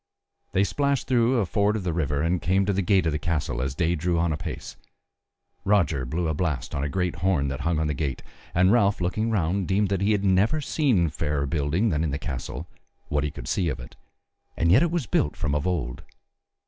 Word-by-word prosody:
They 95 - +3
splashed 140 +5 0
through 125 0 +2
a 110 - +2
ford 100 +3 +1
of 105 - -3
the 90 -2 -1
river 75 -3 0
and 85 +1 0
came 95 +2 +2
to 100 - +1
the 100 - +1
gate 95 -1 +3
of 80 - +2
the 75 - -2
castle 75 -6 -1
as 65 0 -2
day 85 +3 +1
drew 85 +1 0
on 80 -1 +1
apace; 75 - -6 0.9
Roger 80 -10 +2
blew 85 +6 -1
a 80 - 0
blast 75 -6 -2
on 70 - -1
a 70 - -1
great 90 +2 -1
horn 80 -5 +1
that 65 0 -4
hung 85 +1 0
on 80 - 0
the 75 - 0
gate, 70 -1 -3 0.3
and 90 +2 +5
Ralph 105 -4 +3
looking 100 +6 -1
round 95 -2 0
deemed 100 0 +1
he 105 +2 +3
had 100 -1 0
never 100 +10 +3
seen 130 - +1
fairer 75 -2 -1
building 80 - 0
than 75 -2 0
in 80 - 0
the 70 - -2
castle, 65 -4 -5 0.4
what 75 -1 0
he 75 - 0
could - - -9
see 90 -3 0
of 65 -3 -4
it, - - -11 0.6
and 85 0 +2
yet 120 - +6
it 170 - +3
was 170 -5 -1
built 75 - 0
from 70 - -2
of 75 +3 0
old. 75 -10 -2
85 Hz, 225 wpm, -25 LUFS, 75-100 Hz, 0.9 s, yet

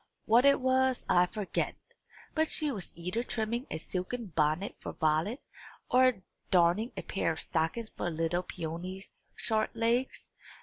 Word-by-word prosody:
What 235 +4 +5
it 280 0 +6
was 260 0 +2
I 180 0 +5
forget; 210 0 -2 0.6
but 315 0 +2
she 305 -2 +1
was 200 -8 -5
either 180 +7 -2
trimming 235 +1 -2
a - - -3
silken 185 +4 -4
bonnet 155 +5 +1
for - - -6
Violet, 160 - 0 0.5
or 255 -6 +4 0.3
darning 180 +6 +3
a - - -3
pair 195 - 0
of - - -8
stockings 165 +8 -1
for 175 - -2
little 165 +2 0
Peony's 180 +3 -7
short 220 -1 0
legs. 235 +3 0
205 Hz, 145 wpm, -31 LUFS, 170-245 Hz, 0.6 s, it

